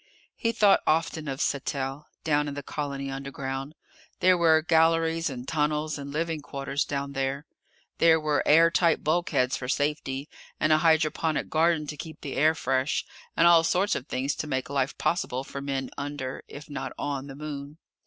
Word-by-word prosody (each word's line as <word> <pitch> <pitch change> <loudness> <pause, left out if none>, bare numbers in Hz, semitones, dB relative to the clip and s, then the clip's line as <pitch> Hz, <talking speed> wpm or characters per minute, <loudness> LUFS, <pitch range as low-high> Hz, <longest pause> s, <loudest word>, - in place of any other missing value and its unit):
He 230 - 0
thought 210 -3 +4
often 160 0 +1
of 135 -1 -3
Sattell, 140 +1 -2 0.2
down 150 -1 +1
in 140 - -4
the 145 - -5
colony 140 -1 -4
underground. 135 +1 -5 0.4
There 185 0 +5
were 160 -2 +4
galleries 165 0 +3
and 125 -2 -7
tunnels 150 0 0
and 140 0 -7
living 160 +1 -2
quarters 140 0 -3
down 140 0 -3
there. 135 +2 -2 0.5
There 165 -1 +6
were 155 -1 +1
air 165 +2 +6
tight 170 -2 +2
bulkheads 155 -5 +1
for 125 - -6
safety, 145 -1 -1 0.3
and 155 - +3
a 155 - +4
hydroponic 160 0 +2
garden 160 -1 +2
to 150 0 -6
keep 160 +2 -9
the 140 - -5
air 155 +3 +4
fresh, 130 +1 0 0.3
and 170 - +5
all 170 -1 +7
sorts 190 +5 +2
of 130 - -4
things 135 +2 -1
to 155 - -3
make 130 -1 -2
life 135 -1 -1
possible 130 -7 -1
for 140 0 -7
men 135 -2 -3
under 140 -2 -4
if 145 +1 -10
not 145 - -5
on 140 -1 -3
the 135 - -9
Moon. 145 0 -7
150 Hz, 175 wpm, -27 LUFS, 140-160 Hz, 0.5 s, all